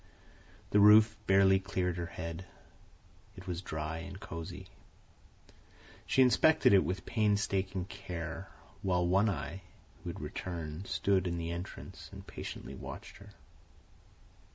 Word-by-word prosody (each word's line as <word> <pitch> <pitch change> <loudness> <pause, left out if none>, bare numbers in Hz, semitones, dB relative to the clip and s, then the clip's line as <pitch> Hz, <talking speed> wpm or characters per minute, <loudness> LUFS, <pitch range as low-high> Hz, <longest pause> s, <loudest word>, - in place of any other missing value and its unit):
The 105 - +5
roof 105 +1 +8
barely 95 0 +6
cleared 95 -2 -1
her 85 -1 -3
head. 85 +1 -6 0.9
It 95 - -10
was 90 -2 -3
dry 80 -2 -4
and 95 +3 -8
cosey. 85 -4 -7 1.4
She 130 - +5
inspected 130 +1 +5
it 95 - +7
with 90 +1 -3
painstaking 100 -4 0
care, 95 -2 -6 0.3
while 90 -2 +1
One 95 +5 +4
Eye, 80 +1 -4 0.4
who - - -4
had - - -6
returned, 85 0 -5
stood 95 -2 +1
in 85 -1 -2
the 85 0 -3
entrance 85 +2 -7
and - - -10
patiently - - -7
watched - - -8
her. - - -14
95 Hz, 130 wpm, -32 LUFS, 85-100 Hz, 1.4 s, roof